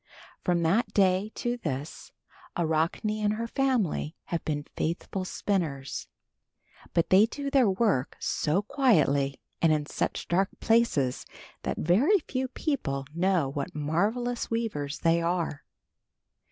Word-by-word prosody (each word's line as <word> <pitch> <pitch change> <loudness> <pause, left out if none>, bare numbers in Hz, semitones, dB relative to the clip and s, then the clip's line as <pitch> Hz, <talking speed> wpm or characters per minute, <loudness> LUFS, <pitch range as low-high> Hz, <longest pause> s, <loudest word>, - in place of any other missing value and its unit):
From 175 -1 +1
that 205 +7 +2
day 195 +1 +3
to 240 0 -2
this 145 - -5 0.5
Arachne 170 +6 0
and 210 0 +2
her 230 +2 -3
family 230 - 0
have 170 - -3
been 145 -2 -2
faithful 185 +3 -2
spinners, 160 -9 -2 0.9
but 170 -1 +2
they 195 +4 +7
do 280 +3 -5
their 260 -6 +5
work 190 - +1
so 170 +7 0
quietly 155 - +2 0.2
and 165 - +5
in 150 -1 +1
such - - -3
dark 190 +3 +2
places, 225 - +2 0.4
that - - -3
very 245 - +4
few 265 -6 -3
people 195 - -2
know 175 -3 +2
what 140 +1 -4
marvelous 210 +12 -1
weavers 205 -11 -2
they 165 0 +2
are. 170 -3 -1
185 Hz, 125 wpm, -28 LUFS, 155-230 Hz, 0.9 s, they